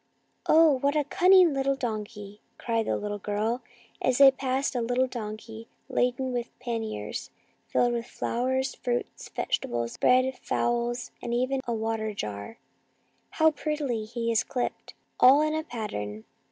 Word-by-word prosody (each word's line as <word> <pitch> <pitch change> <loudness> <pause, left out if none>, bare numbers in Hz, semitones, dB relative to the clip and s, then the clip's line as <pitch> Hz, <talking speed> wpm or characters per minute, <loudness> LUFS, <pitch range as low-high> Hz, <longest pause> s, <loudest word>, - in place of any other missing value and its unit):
" - - -44
Oh, 310 -4 +6
what 280 +3 +1
a 300 - +3
cunning 360 +2 +5
little 275 0 +1
donkey! 210 -4 -5
" - - -43
cried 230 -2 -1
the - - +1
little 205 0 -4
girl, 215 +5 -1 0.4
as 255 -1 +2
they 275 -1 +9
passed 265 +1 -1
a 240 - 0
tiny 245 +2 +1
donkey 225 -1 -7 0.2
laden 250 +1 0
with 240 -1 -4
panniers 225 - -4 0.4
filled 245 0 +2
with 235 0 -3
flowers, 260 +3 -1
fruit, 245 0 -1 0.3
vegetables, 120 0 -2
bread, 255 +1 +3
fowls, 240 0 -1
and 235 0 -2
even 260 +2 0
a 235 - 0
water 220 -1 -2
jar. 105 - -5 0.4
" - - -42
How 320 0 +5
prettily 290 -7 -2
he 230 +1 -2
is 225 - +2
clipped, 250 -2 -4 0.2
all 275 +4 +7
in 310 0 0
a 315 0 -1
pattern." 110 - -5
240 Hz, 155 wpm, -27 LUFS, 220-265 Hz, 0.4 s, they